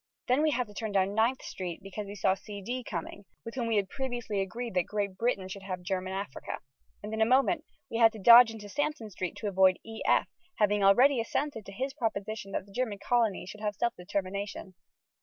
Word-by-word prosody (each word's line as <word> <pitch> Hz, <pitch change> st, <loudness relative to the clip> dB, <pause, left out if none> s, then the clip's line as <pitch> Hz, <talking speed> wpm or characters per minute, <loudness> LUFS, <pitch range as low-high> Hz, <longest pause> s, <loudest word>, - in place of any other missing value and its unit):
Then 255 Hz, +4 st, +3 dB
we 310 Hz, -, +3 dB
had 250 Hz, -4 st, 0 dB
to 210 Hz, -, -14 dB
turn 215 Hz, 0 st, -4 dB
down 195 Hz, 0 st, +2 dB
Ninth 230 Hz, +4 st, +2 dB
Street 180 Hz, -3 st, -5 dB
because 200 Hz, +1 st, -6 dB
we 200 Hz, -, -7 dB
saw 190 Hz, -1 st, +2 dB
C.D. 205 Hz, +5 st, -6 dB
coming, 190 Hz, +2 st, -6 dB, 0.2 s
with 230 Hz, -, -6 dB
whom 240 Hz, -3 st, -2 dB
we 225 Hz, -, +1 dB
had 200 Hz, -2 st, +2 dB
previously 240 Hz, -5 st, -3 dB
agreed 230 Hz, +4 st, -4 dB
that 180 Hz, -1 st, +1 dB
Great 200 Hz, -2 st, -2 dB
Britain 200 Hz, -3 st, 0 dB
should 195 Hz, +1 st, -7 dB
have 185 Hz, -2 st, -5 dB
German 185 Hz, 0 st, -2 dB
Africa. 195 Hz, -8 st, -5 dB, 0.5 s
And 210 Hz, +1 st, -5 dB
in 220 Hz, -, -1 dB
a -, -, +6 dB
moment 275 Hz, +7 st, +3 dB, 0.2 s
we 230 Hz, -, -3 dB
had 225 Hz, -1 st, +7 dB
to -, -, -8 dB
dodge 235 Hz, +3 st, +9 dB
into 215 Hz, -2 st, -9 dB
Sansom 290 Hz, -2 st, -2 dB
Street 185 Hz, -1 st, -4 dB
to 215 Hz, -, -4 dB
avoid 190 Hz, -1 st, +4 dB
E.F., 225 Hz, 0 st, +1 dB, 0.3 s
having 205 Hz, -1 st, +2 dB
already 250 Hz, +7 st, +6 dB
assented 230 Hz, -1 st, -3 dB
to -, -, -7 dB
his 265 Hz, +7 st, -3 dB
proposition 215 Hz, -5 st, -3 dB
that -, -, -2 dB
the 200 Hz, -, -18 dB
German 225 Hz, -2 st, -2 dB
colonies 220 Hz, -4 st, 0 dB
should 210 Hz, -, -12 dB
have 210 Hz, -1 st, -1 dB
self 235 Hz, +4 st, 0 dB
determination. 195 Hz, +1 st, -4 dB
210 Hz, 215 wpm, -30 LUFS, 195-235 Hz, 0.5 s, dodge